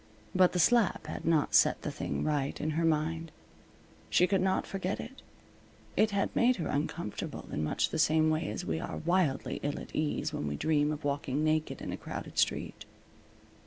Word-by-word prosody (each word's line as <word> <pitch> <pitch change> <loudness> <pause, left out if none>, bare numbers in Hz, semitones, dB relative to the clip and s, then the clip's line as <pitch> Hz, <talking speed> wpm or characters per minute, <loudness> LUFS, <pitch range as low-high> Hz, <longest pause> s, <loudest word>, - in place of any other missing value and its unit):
But 185 -1 +4
the - - 0
slap 225 -1 +3
had 155 - -6
not 160 -2 +2
set - - +4
the - - -2
thing - - -3
right 145 -3 -1
in 155 - -1
her 165 +2 0
mind. 160 +1 0 0.8
She 180 - +5
could 190 0 +1
not 190 0 +1
forget 195 0 -3
it. 265 +3 -8 0.7
It 215 - +4
had 200 -1 -1
made 250 +2 +4
her 170 - -3
uncomfortable 145 - -3
in 75 - -2
much 75 - 0
the 160 - -2
same 155 0 +4
way 155 -8 -1
as 105 - -4
we 80 0 -1
are - - -5
wildly 170 -5 0
ill 145 0 -2
at - - -10
ease 155 -1 -1
when 75 - -3
we 70 - -2
dream 150 - +1
of 150 0 -5
walking 140 0 -1
naked 155 0 0
in - - -4
a - - -4
crowded - - -6
street. - - 0
155 Hz, 195 wpm, -31 LUFS, 145-180 Hz, 0.8 s, She